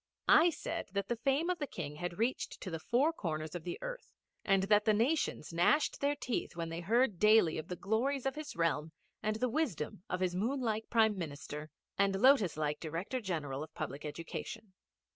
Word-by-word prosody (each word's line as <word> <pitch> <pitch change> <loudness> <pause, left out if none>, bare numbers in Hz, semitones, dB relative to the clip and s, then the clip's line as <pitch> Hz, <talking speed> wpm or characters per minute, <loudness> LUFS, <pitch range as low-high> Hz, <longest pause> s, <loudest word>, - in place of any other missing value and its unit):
I 335 +3 +8
said 330 +1 -4
that 200 0 -2
the 240 - +1
fame 275 +8 +1
of 360 - -3
the 290 - -2
King 150 - -6
had 175 +1 -4
reached 235 +4 -1
to 185 - -5
the 165 - -3
four 260 - +2
corners 155 - -3
of 175 -2 -5
the 365 - -4
earth, - - -7 0.3
and 195 -2 +3
that 210 +1 +4
the 215 -2 +4
nations 230 - 0
gnashed 175 - +3
their 285 +1 +2
teeth 255 -9 -3
when 165 -1 -3
they 165 +1 -4
heard 220 +2 +2
daily 210 -7 +5
of 155 - -7
the 180 - -4
glories 240 +9 0
of 270 - +1
his 305 +1 -7
realm 160 -2 0 0.3
and 215 0 0
the 250 +3 0
wisdom 235 - -2
of 180 - -1
his 185 -1 0
moon 230 +10 0
like 220 -3 -2
Prime 220 -2 +4
Minister 150 -3 -6 0.3
and 195 -1 +3
lotus 250 - +5
like 150 -1 -1
Director 175 +11 -3
General 150 - -3
of 155 +1 -8
Public 140 - -5
Education. 165 +6 -6
200 Hz, 200 wpm, -33 LUFS, 165-255 Hz, 0.3 s, I